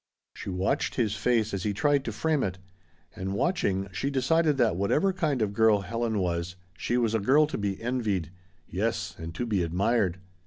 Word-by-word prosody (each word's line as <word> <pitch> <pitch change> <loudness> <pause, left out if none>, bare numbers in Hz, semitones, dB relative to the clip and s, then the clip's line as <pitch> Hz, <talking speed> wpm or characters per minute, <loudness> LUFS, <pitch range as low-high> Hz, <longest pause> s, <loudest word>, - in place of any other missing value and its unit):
She - - -7
watched 95 +1 0
his 110 -5 +1
face 115 -3 +1
as 95 - -2
he 105 +2 -1
tried 145 +5 +2
to 115 - -2
frame 155 +6 0
it. 95 -5 -2 0.6
And 95 -1 -3
watching, 100 - 0
she 100 +9 -2
decided 145 +3 +2
that 115 -8 +3
whatever 150 - +2
kind 150 - 0
of 100 -1 -2
girl 110 -2 +4
Helen 115 +1 -2
was, 90 -1 -1 0.2
she 120 - -1
was 115 -3 +1
a 110 - +2
girl 135 +9 +4
to 150 - -4
be 100 -2 -2
envied. 110 -9 -1 0.4
Yes, 100 0 -2
and 80 0 -7
to 120 - -2
be 105 -5 0
admired. 95 +2 +1
110 Hz, 190 wpm, -28 LUFS, 95-130 Hz, 0.6 s, girl